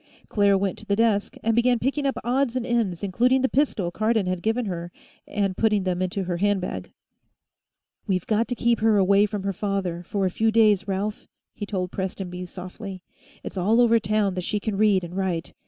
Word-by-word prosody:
Claire 200 -2 +3
went 195 -1 -2
to 215 - -9
the 200 - +2
desk 215 -2 +1
and 225 0 +2
began 240 +1 +3
picking 275 +4 -1
up 270 - -1
odds 255 +1 0
and 255 -2 -1
ends, 225 -8 -1
including 245 +7 +2
the - - +4
pistol 250 -11 0
Cardon 215 +1 +1
had 185 -1 -2
given 225 +4 0
her, 175 -3 -5 0.4
and 200 -2 -1
putting 210 -2 +2
them 185 -1 -1
in 185 - 0
her 175 -1 -2
handbag. 185 - -1 1.2
"We've 185 -3 0
got 225 +1 +1
to 245 - -2
keep 235 -1 +1
her 220 -1 +3
away 200 +2 +4
from 205 -1 -4
her 195 0 -1
father, 190 -3 -2
for 195 +2 -2
a 185 - 0
few 225 +4 +1
days, 215 -3 +4
Ralph," 200 +2 -3 0.3
he 205 - -6
told 185 -3 -3
Prestonby 180 -1 -5
softly. 185 +1 -8 0.4
"It's - - -7
all 210 +6 +3
over 230 -1 +5
town 210 -2 0
that 180 -1 -3
she 210 - -1
can 210 0 -3
read 200 -2 +3
and 175 +1 -7
write. 185 -4 -2
200 Hz, 205 wpm, -24 LUFS, 185-225 Hz, 1.2 s, over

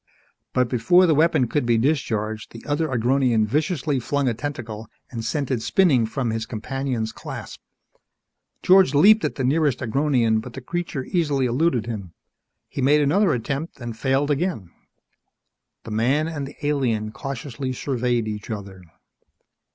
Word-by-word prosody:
But 125 -1 +2
before 130 +10 +4
the 165 - +4
weapon 155 -3 +3
could 145 +4 0
be 120 -1 +2
discharged, 110 -5 -1
the 115 - -11
other 150 +2 0
Agronian 125 -2 +2
viciously 145 - 0
flung 140 +3 -1
a 120 - +2
tentacle 115 -4 -6 0.2
and 115 -3 -5
sent 135 +4 -2
it 120 -3 0
spinning 125 -1 +3
from 120 0 -2
his 110 0 -3
companion's 125 0 -3
clasp. - - -8 1.0
George 185 -6 +5
leaped 210 +9 +6
at - - -1
the 135 - -2
nearest 145 +1 +2
Agronian 125 -3 +1
but 120 +1 -10
the - - -6
creature 170 -2 -4
easily 145 -7 0
eluded 125 -2 +1
him. 100 -7 -6 0.5
He - - -5
made 145 +3 +4
another 170 +6 +3
attempt 140 +5 -3
and 120 -2 -6
failed 135 +4 +1
again. 145 - -2 1.1
The 110 - -8
man 130 +8 +1
and 145 -4 -4
the 140 - -11
alien 120 -7 0
cautiously 135 0 -5
surveyed 125 -3 -1
each 105 +1 -5
other. 100 -3 -6
130 Hz, 150 wpm, -23 LUFS, 115-145 Hz, 1.1 s, leaped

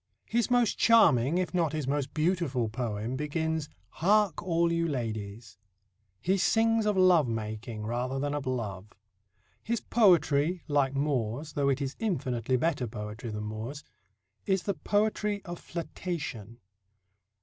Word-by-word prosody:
His 235 +1 0
most 245 -3 +2
charming, 160 - +5
if 180 -3 -1
not 165 -4 +1
his 155 -4 -2
most 140 -1 -1
beautiful 155 - 0
poem 115 0 -3
begins: 155 +2 -2 0.2
"Hark, 205 - +2
all 170 -1 +1
you 170 0 +1
ladies." 110 - -5 0.6
He 190 - +1
sings 225 +2 +3
of 210 -2 +1
love 180 -6 +5
making 110 0 -4
rather 125 +3 -2
than 145 +1 -1
of 145 -2 -3
love. 105 -5 -4 0.7
His 235 +1 -1
poetry, 175 -6 +3
like 140 -2 +1
Moore's 140 0 -1
though 140 -2 +1
it 140 +1 0
is 135 0 -4
infinitely 130 - 0
better 140 -3 0
poetry 105 +1 -6
than 105 -1 -4
Moore's 110 +7 -6 0.6
is 190 -2 +1
the 200 - 0
poetry 210 +1 0
of 175 -1 -6
flirtation. 155 - -5
145 Hz, 140 wpm, -29 LUFS, 120-180 Hz, 0.7 s, charming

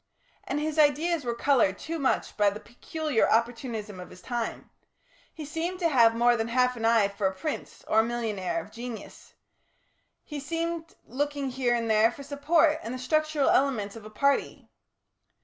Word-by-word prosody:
And - - -2
his 310 +1 -2
ideas 305 +2 +3
were 235 -1 -2
coloured 235 -7 +2
too 330 0 -5
much 270 - 0
by 205 -1 +4
the 205 +1 -7
peculiar 290 +2 -1
opportunism 225 -3 -1
of 180 - -9
his 180 - -14
time; 240 -2 -4 0.6
he 310 - -8
seemed 330 +5 -3
to 345 -2 +1
have 230 -5 +5
more 240 +1 +4
than 225 -1 -1
half 250 +1 +2
an 225 -1 -3
eye 225 -3 +4
for 200 0 -1
a 190 - -3
prince 305 +10 -5
or 220 - +3
a - - +5
millionaire 225 - -2
of - - -10
genius; 235 -1 -9 0.9
he 295 -2 -6
seemed 330 +2 -4
looking 280 +1 -2
here 250 -2 +1
and 230 -1 -1
there 220 +1 +4
for 280 - -10
support 300 +3 +2
and 235 +3 -5
the - - -4
structural 310 +2 +1
elements 235 -7 +1
of 225 - -10
a 215 - -10
party. 280 +6 0
250 Hz, 180 wpm, -27 LUFS, 225-300 Hz, 0.9 s, have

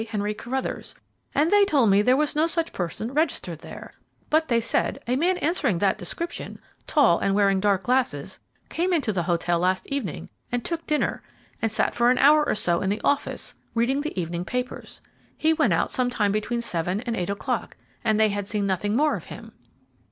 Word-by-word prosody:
Henry 210 -1 -1
Carruthers, 255 +5 -4 0.4
and 305 +4 +3
they 410 0 +6
told 275 - +3
me 200 +1 +5
there 250 +5 +4
was 300 0 0
no 310 +2 +3
such 330 0 -2
person 195 +7 -4
registered 280 - -1
there; - - -10 0.4
but 315 +1 +3
they 235 -3 +2
said 230 - 0
a 250 - +1
man 355 +6 +2
answering 295 - +1
that 195 +2 +1
description, 340 +1 -5 0.3
tall 270 - +4
and 195 - +1
wearing 200 -1 +3
dark 195 -1 +1
glasses, 245 - -1 0.3
came 360 +2 -1
into 280 -10 +1
the 180 - 0
hotel 170 0 0
last 185 +1 +1
evening 270 - -4 0.2
and 245 -1 -2
took 335 -1 -4
dinner 300 -1 0 0.4
and 225 - 0
sat - - +1
for 240 0 +3
an 255 - +3
hour 300 +2 +6
or - - 0
so 175 -5 +1
in 190 - 0
the 205 +2 -1
office 285 - -1 0.2
reading 255 +5 +1
the 300 -10 -4
evening 170 0 -3
papers. 250 +5 -5 0.4
He 320 +1 +3
went - - +2
out - - 0
some 250 -1 +1
time 210 -5 +1
between 225 +3 -1
seven 180 -1 -2
and 235 -2 -3
eight 180 -2 -2
o'clock, 200 +1 -3 0.3
and 215 -1 +2
they 215 -1 +5
had 205 -1 -3
seen 210 -2 -1
nothing 200 +2 0
more 300 +4 +3
of - - -7
him." - - -10
230 Hz, 200 wpm, -25 LUFS, 195-290 Hz, 0.4 s, they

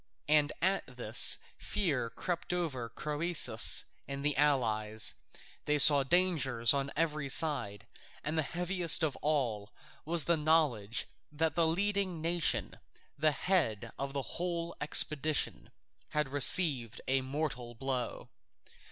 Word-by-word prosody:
And 150 0 +2
at 185 -9 -2
this 115 -2 +4 0.2
fear 145 - -2
crept 175 +6 -5
over 140 -10 -4
Croesus 155 +5 +2 0.2
and 140 +1 -7
the 150 -1 0
allies; 110 -7 0 0.5
they 150 0 0
saw 145 0 +8
dangers 135 -7 +1
on 140 0 -3
every 150 -3 -2
side, 130 - +1 0.4
and 155 +2 -3
heaviest 175 +2 +1
of 150 -3 -1
all 120 -9 -3 0.3
was 165 0 0
the 170 - +1
knowledge 150 -9 0 0.3
that 155 0 -2
the 165 0 +1
leading 195 0 -2
nation, 165 +1 -2 0.4
the 155 +2 +1
head 130 - -2
of 135 0 -5
the 140 +2 -6
whole 170 -1 -4
expedition, 150 - +2 0.4
had 150 -2 -2
received 140 - +5
a 135 0 0
mortal 130 -3 -5
blow. 130 -1 -5
150 Hz, 120 wpm, -30 LUFS, 130-165 Hz, 0.5 s, saw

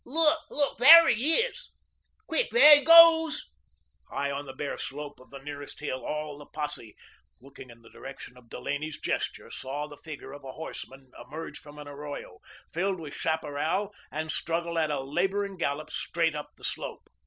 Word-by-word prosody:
"Look! 315 +3 +2
Look! 285 -1 -1
There 330 +6 +10
he 255 +8 +3
is! - - 0 0.6
Quick, - - 0
there 305 -11 +9
he 290 - -2
goes!" 330 -1 +7 0.6
High 140 0 -2
on 140 0 -5
the 135 - -8
bare 140 +2 -5
slope 145 +1 -7
of 130 - -18
the 140 - -10
nearest 145 0 -8
hill, 130 -3 -4
all 150 -1 -5
the 145 - -12
posse, 145 -7 -5 0.4
looking 130 0 -14
in 115 0 -16
the 115 - -16
direction 135 -2 -10
of 125 -2 -19
Delaney's 150 +4 -5
gesture, - - -3
saw 140 +3 -5
the 150 -1 -12
figure 150 -4 -10
of 145 0 -11
a 130 -1 -8
horseman 135 -4 -9
emerge 160 +3 -8
from 150 -1 -14
an 150 -1 -9
arroyo, 145 +1 -8 0.3
filled 185 +2 -1
with 150 -3 -8
chaparral, 160 +6 -2 0.2
and 155 +1 -3
struggle 170 +1 -2
at 155 -1 +1
a 145 -2 -2
labouring 195 +8 -1
gallop 155 -3 -3
straight 165 -1 -1
up 150 -1 -6
the - - -21
slope. - - -6
150 Hz, 175 wpm, -28 LUFS, 140-195 Hz, 0.6 s, There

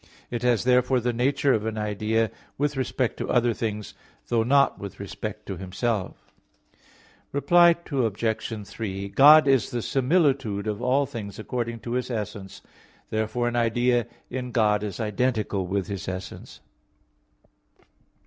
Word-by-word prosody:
It 120 -1 -3
has 125 -2 +2
therefore 125 +1 +3
the 120 0 -1
nature 135 +3 +2
of 105 - 0
an 110 -1 -3
idea 105 +1 0 0.3
with 145 +1 0
respect 130 -1 -1
to - - -4
other 120 -1 +3
things; 105 -2 -4 0.4
though 115 -1 +2
not 140 +4 +3
with 100 -1 -8
respect 105 +1 -6
to 95 - -5
Himself. 95 +2 -3 1.0
Reply 170 +4 +5 0.2
Obj. 110 -4 -1
3: 100 -1 -5
God 150 +6 +7
is 135 -6 +3
the 120 -2 -3
similitude 135 - +1
of 105 0 -3
all 130 +3 +2
things 110 -7 -7
according 115 0 -4
to 120 - -6
His 125 +1 -1
essence; 105 -4 -5 0.5
therefore 110 +3 -1
an 120 - -2
idea 120 0 +2 0.2
in 125 0 -4
God 105 -3 +2
is 105 -3 -5
identical 110 -3 -1
with 95 0 -1
His 100 -2 -6
essence. 95 0 -7
115 Hz, 140 wpm, -25 LUFS, 105-125 Hz, 1.0 s, God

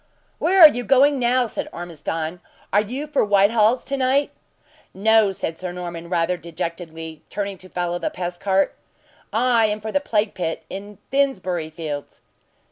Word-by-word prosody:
"Where 380 +3 +2
are 320 - +14
you 245 -4 -2
going 275 +2 +4
now?" 250 +1 +2
said 225 - -5
Ormiston. 165 0 -5 0.3
"Are 205 - +5
you 255 +8 -4
for 300 -2 +1
Whitehall's 210 +4 +3
to 275 - -2
night?" 270 +2 +2 0.6
"No!" 220 +1 +4
said 165 -3 -4
Sir 185 -1 -4
Norman, 170 -1 -6
rather 175 0 +1
dejectedly, 165 -2 -6
turning 200 -2 -4
to 185 - -14
follow 175 -1 -2
the - - -1
pest 175 -1 -5
cart. 195 0 +1 0.6
"I 230 -1 +3
am 210 0 -2
for 220 +1 -5
the 285 - +2
plague 220 -6 0
pit 165 -3 -3
in 205 +1 -8
Finsbury 185 - 0
fields!" 155 -3 -6
195 Hz, 160 wpm, -22 LUFS, 175-240 Hz, 0.6 s, are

